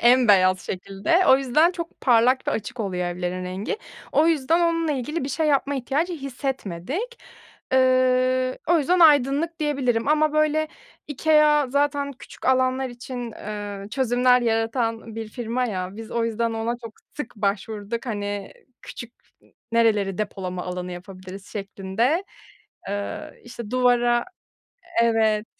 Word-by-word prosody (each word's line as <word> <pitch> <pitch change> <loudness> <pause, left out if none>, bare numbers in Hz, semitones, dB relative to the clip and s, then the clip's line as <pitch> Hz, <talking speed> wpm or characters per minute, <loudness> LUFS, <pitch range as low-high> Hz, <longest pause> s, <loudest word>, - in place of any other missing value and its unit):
en 245 0 +5
beyaz 185 -2 +5
şekilde. 195 - -1
O 265 - +8
yüzden 275 +5 +3
çok 335 -2 -7
parlak 250 +1 +3
ve - - +3
açık 225 +3 -4
oluyor 185 -4 -2
evlerin 180 +1 -3
rengi. 185 - -4 0.3
O 310 - +4
yüzden 325 +1 +2
onunla 330 -2 +1
ilgili 290 +4 -3
bir - - -3
şey 310 +3 0
yapma 285 -1 +2
ihtiyacı 280 +7 -1
hissetmedik. 275 - -4 0.5
Iıı, 255 0 +3
o 345 0 +5
yüzden 350 +5 +2
aydınlık 300 +1 +4
diyebilirim 270 -5 0
ama, 305 0 +3
böyle, 305 0 +2 0.4
IKEA 300 0 +3
zaten 285 0 0
küçük 255 - -11
alanlar 260 0 +2
için, 245 -1 -7
ııı, 205 -1 -6
çözümler 250 +1 +3
yaratan 225 0 -1
bir 225 -1 -5
firma 240 +2 -2
ya. 190 -4 -4
Biz 225 0 -8
o 235 -1 0
yüzden 230 0 -1
ona 225 +1 -1
çok 225 - -7 0.2
sık 295 -5 -6
başvurduk. 210 +3 -2
Hani, 205 -3 -4 0.3
küçük 235 -1 -9 0.6
nereleri 210 -5 +2
depolama 185 -3 -3
alanı 180 0 -5
yapabiliriz 185 +1 -10
şeklinde. 210 - -1 0.6
Iıı, 200 0 -4
işte 235 -3 -8
duvara 240 -1 +3 0.8
Evet. 220 -2 +2
240 Hz, 135 wpm, -24 LUFS, 210-280 Hz, 0.8 s, O